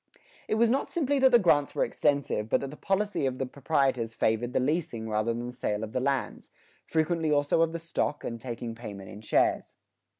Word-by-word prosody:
[81:2] -, -, -27 dB, 0.3 s
It -, -, +1 dB
was 230 Hz, +1 st, +4 dB
not 270 Hz, -, +1 dB
simply 285 Hz, -4 st, 0 dB
that 265 Hz, 0 st, +6 dB
the 240 Hz, -, +8 dB
grants 150 Hz, -9 st, +2 dB
were -, -, +2 dB
extensive, 140 Hz, -7 st, 0 dB
but -, -, +3 dB
that 135 Hz, -1 st, -5 dB
the -, -, -9 dB
policy 195 Hz, -4 st, 0 dB
of 130 Hz, -1 st, -3 dB
the 135 Hz, -, -1 dB
proprietors 130 Hz, -4 st, 0 dB
favored 110 Hz, +3 st, +1 dB
the -, -, +1 dB
leasing 130 Hz, -5 st, -1 dB
rather 110 Hz, +1 st, 0 dB
than 120 Hz, +1 st, -3 dB
the 125 Hz, -, -6 dB
sale 105 Hz, -4 st, -2 dB
of 110 Hz, -, -5 dB
the 130 Hz, -, +1 dB
lands 135 Hz, 0 st, -2 dB, 0.4 s
frequently 160 Hz, 0 st, +1 dB
also 145 Hz, +2 st, +2 dB
of 165 Hz, -1 st, +3 dB
the 170 Hz, -, -3 dB
stock, 165 Hz, -3 st, -2 dB
and 115 Hz, -1 st, -5 dB
taking 120 Hz, -2 st, -5 dB
payment 105 Hz, -4 st, -9 dB
in 105 Hz, -, -10 dB
shares. 110 Hz, -, +1 dB
135 Hz, 220 wpm, -28 LUFS, 115-165 Hz, 0.4 s, the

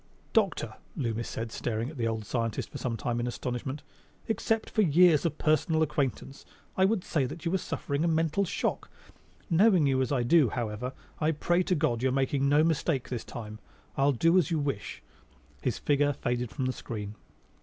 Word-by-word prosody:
"Doctor," -, -, +1 dB, 0.2 s
Loomis 115 Hz, -2 st, -2 dB
said 115 Hz, 0 st, -4 dB
after -, -, -8 dB
staring 115 Hz, +3 st, -2 dB
at -, -, -12 dB
the 115 Hz, -2 st, 0 dB
old 110 Hz, -1 st, -3 dB
scientist 115 Hz, 0 st, -3 dB
some 115 Hz, -3 st, -2 dB
time 120 Hz, +2 st, -2 dB
in 120 Hz, -, -1 dB
astonishment, 125 Hz, +3 st, -4 dB, 0.4 s
"except 225 Hz, 0 st, 0 dB
for 215 Hz, -, +2 dB
years 170 Hz, -2 st, +5 dB
of 155 Hz, -2 st, -5 dB
personal 160 Hz, +1 st, +2 dB
acquaintance, 140 Hz, -2 st, -2 dB, 0.3 s
I 190 Hz, -, +4 dB
would 200 Hz, -2 st, +1 dB
say 145 Hz, -5 st, 0 dB
that 155 Hz, +6 st, -8 dB
you 165 Hz, -, +1 dB
were 190 Hz, -, +1 dB
suffering 145 Hz, -2 st, -2 dB
a -, -, +2 dB
mental 165 Hz, +3 st, +1 dB
shock. 185 Hz, -, -2 dB, 0.6 s
Knowing 185 Hz, -2 st, +4 dB
you 135 Hz, -1 st, +2 dB
as 130 Hz, -, -1 dB
I 130 Hz, -4 st, +1 dB
do, 140 Hz, 0 st, +5 dB
however, 120 Hz, +3 st, -3 dB, 0.3 s
I 155 Hz, -, +2 dB
pray 175 Hz, +3 st, +1 dB
to 180 Hz, 0 st, +1 dB
God 145 Hz, -7 st, 0 dB
you're 130 Hz, 0 st, +2 dB
making 135 Hz, +1 st, +1 dB
no 145 Hz, +2 st, +5 dB
mistake 160 Hz, -4 st, 0 dB
this 125 Hz, -2 st, -3 dB
time. 110 Hz, -2 st, -8 dB, 0.4 s
I'll 140 Hz, +1 st, +3 dB
do 165 Hz, +8 st, +4 dB
as 180 Hz, -, 0 dB
you 165 Hz, -, +1 dB
wish." 140 Hz, -10 st, -3 dB, 0.6 s
His -, -, -1 dB
figure 145 Hz, 0 st, +2 dB
faded 120 Hz, -2 st, -2 dB
from 130 Hz, +1 st, -3 dB
the 130 Hz, -, 0 dB
screen. 105 Hz, -4 st, -6 dB
140 Hz, 190 wpm, -29 LUFS, 120-165 Hz, 0.6 s, years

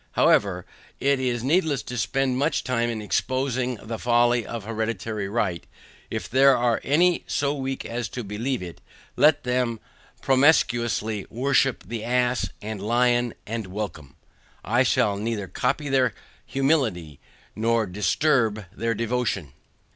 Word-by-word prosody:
However, 90 Hz, -3 st, +3 dB, 0.3 s
it 140 Hz, 0 st, +2 dB
is 120 Hz, -3 st, -1 dB
needless 150 Hz, -, +1 dB
to 125 Hz, -, -7 dB
spend 130 Hz, +4 st, 0 dB
much 150 Hz, +2 st, +1 dB
time 120 Hz, -2 st, 0 dB
in 110 Hz, -2 st, -4 dB
exposing 130 Hz, +2 st, -1 dB
the 110 Hz, +1 st, -7 dB
folly 120 Hz, 0 st, +3 dB
of 115 Hz, -3 st, -5 dB
hereditary 110 Hz, -2 st, -3 dB
right, 100 Hz, -6 st, -1 dB, 0.5 s
if -, -, -4 dB
there 135 Hz, +1 st, +5 dB
are 120 Hz, -1 st, +1 dB
any 170 Hz, +5 st, +3 dB
so 140 Hz, 0 st, 0 dB
weak 135 Hz, -2 st, -4 dB
as 120 Hz, +1 st, -4 dB
to 120 Hz, -, -5 dB
believe 110 Hz, +3 st, -3 dB
it, 85 Hz, -2 st, -9 dB, 0.3 s
let 150 Hz, 0 st, +4 dB
them 125 Hz, -2 st, 0 dB, 0.4 s
promiscuously 120 Hz, -6 st, +2 dB
worship 135 Hz, +1 st, +1 dB
the 115 Hz, -2 st, -5 dB
ass 125 Hz, +1 st, +1 dB
and 105 Hz, -2 st, -5 dB
lion, 120 Hz, +2 st, +2 dB
and 110 Hz, -2 st, -4 dB
welcome. 90 Hz, -8 st, -6 dB, 0.5 s
I 120 Hz, +4 st, +2 dB
shall 120 Hz, -5 st, +2 dB
neither 105 Hz, -1 st, -3 dB
copy 125 Hz, -, -1 dB
their 130 Hz, -2 st, +2 dB, 0.3 s
humility, 120 Hz, -, 0 dB, 0.4 s
nor 115 Hz, +1 st, +1 dB
disturb 105 Hz, -, +1 dB
their 115 Hz, 0 st, -1 dB
devotion. 115 Hz, -, -2 dB
120 Hz, 135 wpm, -24 LUFS, 110-130 Hz, 0.5 s, there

